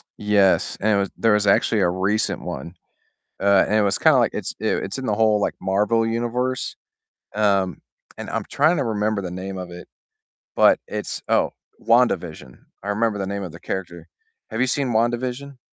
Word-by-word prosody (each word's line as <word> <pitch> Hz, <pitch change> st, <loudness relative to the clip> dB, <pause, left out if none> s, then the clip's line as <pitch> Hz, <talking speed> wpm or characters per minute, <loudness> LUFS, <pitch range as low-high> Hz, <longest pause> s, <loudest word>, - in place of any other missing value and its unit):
Yes, 105 Hz, -2 st, +2 dB
anyways, 100 Hz, -2 st, +1 dB
there 115 Hz, -2 st, +3 dB
was 105 Hz, -1 st, +2 dB
actually 105 Hz, +1 st, +3 dB
a 90 Hz, -, +3 dB
recent 95 Hz, +4 st, -1 dB
one, 85 Hz, -, -7 dB, 0.6 s
uh, 100 Hz, -1 st, +4 dB
and 105 Hz, -, 0 dB
it 110 Hz, -, +4 dB
was 100 Hz, -1 st, +1 dB
kinda -, -, +5 dB
like -, -, +2 dB
it's, -, -, -4 dB
eh -, -, +1 dB, 0.2 s
in 135 Hz, -, -5 dB
the 105 Hz, -, 0 dB
whole, 110 Hz, -1 st, +3 dB
like, -, -, -1 dB
Marvel 105 Hz, +4 st, +1 dB
universe, 120 Hz, +3 st, -2 dB, 0.6 s
um, 100 Hz, -5 st, +1 dB, 0.4 s
and -, -, -7 dB
I'm -, -, -3 dB
tryna 150 Hz, -3 st, +2 dB
remember 105 Hz, -1 st, -1 dB
the 90 Hz, -, -5 dB
name 95 Hz, +1 st, -6 dB
of 90 Hz, -1 st, -7 dB
it, 90 Hz, 0 st, -10 dB, 0.7 s
but -, -, +5 dB
it's -, -, -5 dB
oh, -, -, +2 dB, 0.3 s
WandaVision. 90 Hz, -, +1 dB, 0.2 s
I 100 Hz, -, -7 dB
remember 105 Hz, 0 st, 0 dB
the 95 Hz, -, -3 dB
name 100 Hz, 0 st, -4 dB
of 90 Hz, -, -6 dB
the 85 Hz, -, -12 dB
character, 85 Hz, -2 st, -6 dB, 0.4 s
have 110 Hz, -, -3 dB
you 130 Hz, -, +3 dB
seen 135 Hz, +1 st, 0 dB
WandaVision? 125 Hz, +4 st, -1 dB
105 Hz, 175 wpm, -22 LUFS, 95-115 Hz, 0.7 s, kinda